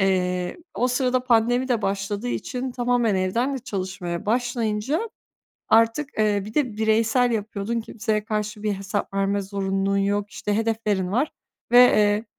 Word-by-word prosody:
Eee, 180 -2 0 0.2
o 250 - +1
sırada 255 0 +1
pandemi 245 +2 +2
de 235 -3 +1
başladığı 200 +4 -2
için 255 +1 -3
tamamen 240 -3 +1
evden 230 +9 0
de - - -2
çalışmaya 190 -5 -4
başlayınca 240 - -1 0.6
artık, 230 +6 +3
eee, 205 -2 +2
bir 215 +2 -9
de 250 -8 0
bireysel 225 +3 +2
yapıyordun, 220 +1 -2
kimseye 215 -1 -2
karşı 210 -1 -3
bir 210 -1 0
hesap 195 +1 -4
verme 195 0 +1
zorunluluğun 195 0 -1
yok, 200 +1 0
işte 205 - -3
hedeflerin 215 -4 0
var 270 +8 +1 0.4
ve, - - +6
eee, 210 -3 +5
215 Hz, 145 wpm, -24 LUFS, 200-245 Hz, 0.6 s, ve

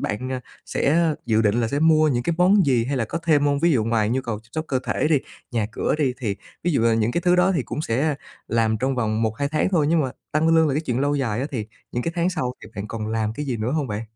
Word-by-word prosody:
bạn, 130 +5 -3
à, 130 - -3 0.3
sẽ 160 +2 +2
dự 110 -1 +3
định 110 +3 +2
là 115 - 0
sẽ 140 - -1
mua 155 0 +4
những 120 -4 0
cái 170 +6 0
món 185 0 +5
gì? 125 -4 +3
Hay 140 +2 -2
là 120 - 0
có 165 - -4
thêm 150 -3 +3
hông? 140 -1 +2
Ví 170 +2 +4
dụ 115 -6 +2
ngoài 110 -2 +1
nhu 130 +2 +1
cầu 115 -4 -4
chăm 115 - -26
sóc 155 0 -2
cơ 130 - +1
thể - - 0
đi, 155 -3 +4 0.3
nhà 115 -5 0
cửa - - 0
đi, 135 -4 +2
thì 105 -6 -2 0.3
ví 175 - +1
dụ 140 - +2
là 115 -1 +4
những 115 +1 +1
cái 170 - 0
thứ 180 0 +3
đó 180 +2 +4
thì 165 -8 0
cũng 150 - -4
sẽ 145 +6 0 0.3
làm 115 -1 +1
trong 130 +3 0
vòng 110 -2 0
1-2 115 +6 -1
tháng 155 +3 +1
thôi, 160 -6 +2
nhưng 165 -1 +3
mà 130 -3 -1 0.2
tăng 155 +2 +2
lương 160 -1 +4
là 135 - 0
cái 150 - +1
chuyện 125 -6 -2
lâu 145 +1 +1
dài 120 -5 -1
á, 135 - -1
thì 110 -6 -3 0.3
những 120 - -1
cái 165 - -2
tháng 175 +2 +2
sau 135 -9 -2
thì - - -11
bạn 100 +1 -5
còn 110 -2 -4
làm 110 -1 -1
cái 150 +5 -5
gì 130 -3 -1
nữa 110 +3 -2
hông 155 -3 0
bạn? 105 +1 -3
130 Hz, 300 wpm, -23 LUFS, 115-155 Hz, 0.3 s, món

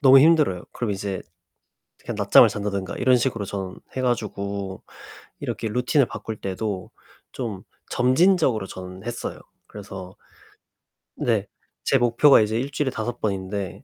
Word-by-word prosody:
너무 135 -1 +8
힘들어요. 150 - +4
그럼 120 -4 -2
이제 100 -1 -3 0.8
그냥 - - -6
낮잠을 - - +7
잔다든가 100 -2 -3
이런 125 0 +4
식으로 115 -4 -1
전 95 -2 -5 0.2
해 130 - -1
가지고 100 -5 -2 0.6
이렇게 110 - -3
루틴을 125 +4 +2
바꿀 110 - -6
때도 95 0 -3 0.4
좀 110 -7 -5 0.3
점진적으로 130 - +3
저는 95 0 -9
했어요. 120 0 -5 0.3
그래서 95 -2 -9 1.0
네. 110 -4 0 0.4
제 135 - +3
목표가 120 +3 +6
이제 110 +1 0
1 140 +3 -3
주일에 140 -1 0
5 120 -1 -4
번인데 95 -2 -3
110 Hz, 285 characters per minute, -24 LUFS, 95-125 Hz, 1.0 s, 너무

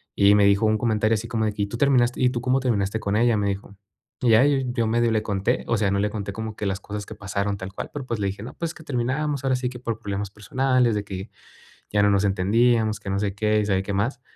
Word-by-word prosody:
Y 100 +1 +5
me 105 - +5
dijo 100 +2 +4
un 110 0 +3
comentario 110 0 +1
así 110 +2 -4
como 110 -1 -1
de: 105 - -1
"¿Y 100 - +1
tú 110 - -6
terminaste 125 -2 +2
y 125 - +5
tú 125 - -3
cómo 130 +1 +2
terminaste 110 -4 0
con 105 0 0
ella?", 120 -1 +3
me 100 - 0
dijo. 100 +1 -5 0.5
Y 125 - +2
ya, 115 +5 +6
yo 130 -5 +1
medio 115 0 +2
le 110 -1 +1
conté, 100 -2 -1
o 115 - +1
sea, 100 -2 +1
no 100 - +1
le 105 - +1
conté 100 -2 -4
como 110 0 -5
que 105 - -4
las 95 0 -1
cosas 105 0 -6
que 110 - -9
pasaron 100 -1 -2
tal 95 0 -7
cual, - - -6
pero, 140 -3 -5
pues, 115 -3 -3
le 100 - +1
dije, 100 +2 -5
no, 120 - -8
pues, 170 0 -3
que 160 - -13
terminábamos 140 +2 -1
ahora 130 -1 +2
sí 125 0 -2
que 125 -1 -9
por 115 -3 -4
problemas 100 -1 -4
personales, 125 +2 +1
de 105 - -1
que 95 +1 -7 0.6
ya 105 - +3
no 105 - +4
nos 100 0 +2
entendíamos, 110 +3 +2
que 100 - -7
no 100 - 0
sé 100 -1 -2
qué, 105 0 +2
y 105 - 0
sabe 95 -1 +1
qué 100 0 -4
más. 115 +6 -1
110 Hz, 275 wpm, -24 LUFS, 100-120 Hz, 0.6 s, ya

